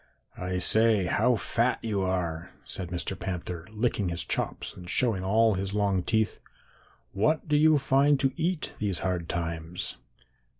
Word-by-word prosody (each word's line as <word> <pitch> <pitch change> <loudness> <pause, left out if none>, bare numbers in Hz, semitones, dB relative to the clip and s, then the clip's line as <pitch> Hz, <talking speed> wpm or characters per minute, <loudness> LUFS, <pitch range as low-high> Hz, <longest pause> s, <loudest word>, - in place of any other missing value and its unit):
"'I 90 0 -3
say, 110 +1 +4
how 115 +7 +2
fat 115 +3 0
you 105 -4 -1
are,' 90 -3 -2 0.2
said 95 -3 -5
Mr. 90 +2 -3
Panther, 90 -2 -5
licking 110 -3 -1
his 85 -3 -3
chops - - -2
and 90 -1 -11
showing 105 -2 +2
all 110 +3 +3
his 95 +1 -3
long 100 -3 +1
teeth. 110 +3 0 0.7
'What 150 +13 +1
do 150 - +2
you 155 +1 +5
find 140 +1 +3
to 135 - +2
eat 170 0 -2
these 100 -5 -1
hard 90 -3 -2
times?' 85 0 -3
100 Hz, 155 wpm, -28 LUFS, 90-115 Hz, 0.7 s, you